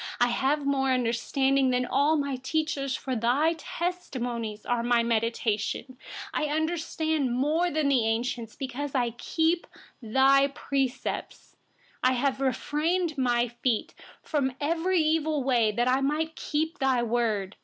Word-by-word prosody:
99I 245 - +4
have 280 +4 0
more 270 -1 +1
understanding 260 +2 +1
than 250 0 +1
all 295 +5 +2
my 280 -2 -1
teachers, 275 0 -1
for 265 - -6
your 255 +7 +2
testimonies 245 -11 -4
are 240 -1 0
my 240 0 +2
meditation. 230 +2 -1 0.4
100I 300 - 0
understand 315 -4 -1
more 315 +6 +2
than 310 -3 +1
the 245 -5 +3
aged, 230 0 -2
because 275 +1 -4
I 240 -2 +1
have 235 - -24
kept 325 +5 0 0.3
your 270 +4 +4
precepts. 270 -3 -3 0.5
101I 255 0 +4
have 265 +1 0 0.7
kept 295 -3 -8
my 245 -1 +2
feet 240 -4 0 0.3
from 270 -4 0
every 335 +5 0
evil 310 -2 +1
way, 240 -5 +3
that 240 +3 0
I 260 +2 +3
might 300 +4 0
observe 315 +2 -1
your 260 -3 +2
word. 220 -4 -1
265 Hz, 140 wpm, -27 LUFS, 240-300 Hz, 0.7 s, 99I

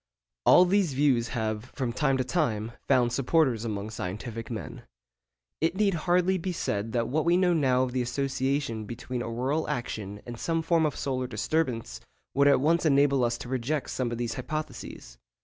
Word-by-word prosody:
All 180 - +8
these 185 -4 +2
views 130 -4 +3
have 110 -2 -2
from 125 -3 -2
time 135 -1 +1
to 130 - +1
time 120 -7 -1 0.2
found 125 -3 +3
supporters 130 -3 +2
among 105 -1 -4
scientific 110 +3 -5
men. 110 -4 -6 0.8
It 165 +3 +1
need 200 -1 +2
hardly 180 +3 +2
be 185 +2 -3
said 105 -8 -2
that 115 -1 +1
what 150 +5 0
we 170 +1 +3
now 180 -1 +3
know 130 -5 +3
of 130 - -2
the 130 0 0
association 130 -2 -1
between 120 +2 -5
auroral 130 +8 -1
action 110 -7 -4
and 120 -1 -7
some 165 -1 -1
form 165 -1 +3
of 150 - -4
solar 130 -2 -2
disturbance, 120 -1 -2 0.3
would 140 +1 +4
at 140 - +5
once 165 +4 +3
enable 140 -3 +4
us 120 0 +1
to 120 - -8
reject 130 +3 -2
some 125 -2 -2
of 120 - -3
these 120 -1 -2
hypotheses. 140 - -6
130 Hz, 180 wpm, -28 LUFS, 115-155 Hz, 0.8 s, All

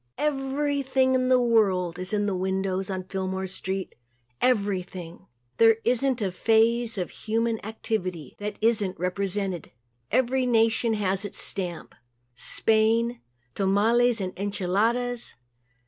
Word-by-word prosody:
Everything 270 -2 0
in 255 0 +1
the 255 -1 +5
world 195 -7 +2
is 185 +1 -2
in 205 -1 +1
the 200 -2 -1
windows 190 0 -1
on 185 -1 -3
Fillmore 190 0 -3
street 190 0 -4 0.5
everything. 190 -6 -1 0.3
There 225 -1 +6
isn't 250 0 +2
a 190 - -1
phase 225 +3 +2
of 180 -2 -3
human 225 +1 -2
activity 185 - -4
that 210 0 -4
isn't 215 -4 +2
represented. 190 0 -2 0.4
Every 255 +2 +1
nation 225 -1 +2
has 195 -2 0
left 205 - -1
its 205 - -3
stamp. 180 -4 0 0.4
Spain 225 - +2 0.3
tamales 225 +5 +2
and 185 -2 -3
enchiladas. 215 +5 -1
210 Hz, 120 wpm, -26 LUFS, 190-235 Hz, 0.5 s, There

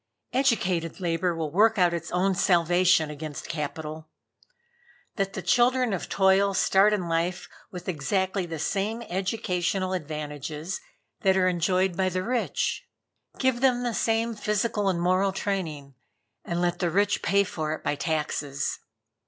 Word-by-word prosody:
Educated 190 - +1
Labor 175 0 0
will 160 -2 -3
work 215 +6 +4
out 175 -2 +4
its 170 -1 -4
own 190 +2 +1
salvation 175 -2 +3
against 150 -1 -7
Capital. 155 0 -5 1.1
Let 195 -2 -1
the - - -5
children 250 -1 +3
of 185 - -4
toil 195 0 +3
start 195 +2 +4
in 195 -5 -1
life 170 +2 -1 0.2
with 180 -1 -9
exactly 190 +3 -1
the 165 -1 -5
same 205 +8 -2
educational 185 -1 -1
advantages 150 0 -5 0.4
that 190 0 +3
are 185 -1 +3
enjoyed 180 +1 +1
by 190 0 +1
the 185 0 -2
rich. 245 +2 -1 0.5
Give 260 -2 +1
them 250 -2 +3
the 240 -1 -1
same 225 +1 +1
physical 210 -1 0
and 180 -2 0
moral 185 +3 +2
training, 165 -8 -3 0.5
and 170 0 -3
let 175 0 0
the 175 - +1
rich 205 +3 +1
pay 200 +3 +3
for 155 -5 -3
it - - -13
by - - 0
taxes." 145 -2 -2
185 Hz, 145 wpm, -26 LUFS, 165-200 Hz, 1.1 s, work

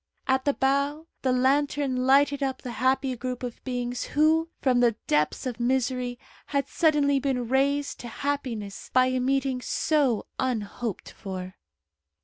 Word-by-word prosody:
At 265 0 +2
the 285 - +2
bow 280 +3 +1 0.2
the 260 - +1
lantern 265 0 +1
lighted 285 +1 +4
up 265 -1 -2
the 250 - -5
happy 260 +3 +1
group 250 +1 -5
of 245 -2 -6
beings 245 -1 -3
who, 320 +2 +4
from 255 -3 +2
the 240 -2 +3
depths 150 - +1
of 245 -2 -4
misery, 250 0 0 0.3
had 280 -1 -1
suddenly 290 -4 +3
been 260 -3 -1
raised 280 +3 +1
to 240 - -7
happiness 235 -6 -4
by 255 0 +5
a 255 0 0
meeting 265 0 0
so 275 -5 +1
unhoped 230 -4 -3
for. 185 -1 -7
260 Hz, 145 wpm, -26 LUFS, 245-280 Hz, 0.3 s, by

